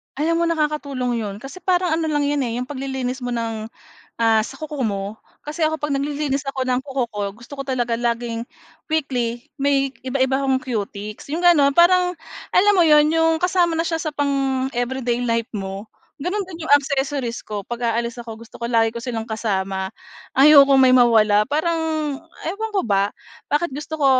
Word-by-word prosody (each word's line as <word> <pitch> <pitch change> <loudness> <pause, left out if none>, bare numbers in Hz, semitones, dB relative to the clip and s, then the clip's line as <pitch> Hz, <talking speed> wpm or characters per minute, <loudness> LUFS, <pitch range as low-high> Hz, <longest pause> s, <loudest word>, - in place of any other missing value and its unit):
Alam 330 +4 +1
mo - - +2
nakakatulong 285 -6 -1
'yon 205 -3 -4
kasi 280 +7 -9
parang 360 -2 +1
ano 320 0 0
lang 295 -2 +1
'yan, 290 0 0
eh, 230 - -3
'yong 245 - -2
paglilinis 265 -1 -3
mo 245 -1 -3
ng, 225 -1 -3 0.5
ah, 225 -1 +4
sa 270 +5 -8
kuko 300 -3 -4
mo. 200 -2 -2 0.3
Kasi 305 +2 -4
ako 315 0 +1
'pag 295 -2 -2
naglilinis 285 0 -1
ako 260 -1 -3
ng 255 0 0
kuko 270 -3 -2
ko - - -5
gusto 235 +7 -12
ko 275 - -4
talaga 245 -3 -1
laging 235 0 -2 0.5
weekly 250 -5 -1
may 275 -1 +1
iba-iba 265 +1 0
akong 265 -1 +2
cutex 215 -2 -5
'yong 315 - -1
gano'n, 290 -5 +6
parang, 360 +3 +4 0.3
alam 410 +3 +5
mo 360 - +5
'yon 300 -2 +6
'yong 325 +1 +2
kasama 350 -1 +1
na 330 - 0
siya 325 -1 -1
sa 310 - -2
pang 275 -2 0
everyday 245 0 -1
life 230 -1 0
mo. 195 +1 -5 0.3
Gano'n 360 +8 -2
din 340 -4 -8
'yong 285 - +6
accessories 275 -3 0
ko 210 -2 -4
pag-aalis 235 +1 -2
ako 230 -1 -8
gusto 230 - -13
ko 235 - -3
lagi 225 -1 +2
ko 235 - -6
silang 230 -2 -5
kasama. 190 -3 -2 0.4
Ayokong 275 -1 +7
may 260 - +6
mawala 220 -4 +5
parang 315 +4 0 0.7
ewan 440 +4 -4
ko 390 - +2
ba, 200 -2 +1 0.3
bakit 295 +3 0
gusto 295 +3 -6
ko 295 -3 +1
265 Hz, 180 wpm, -21 LUFS, 235-300 Hz, 0.7 s, Ayokong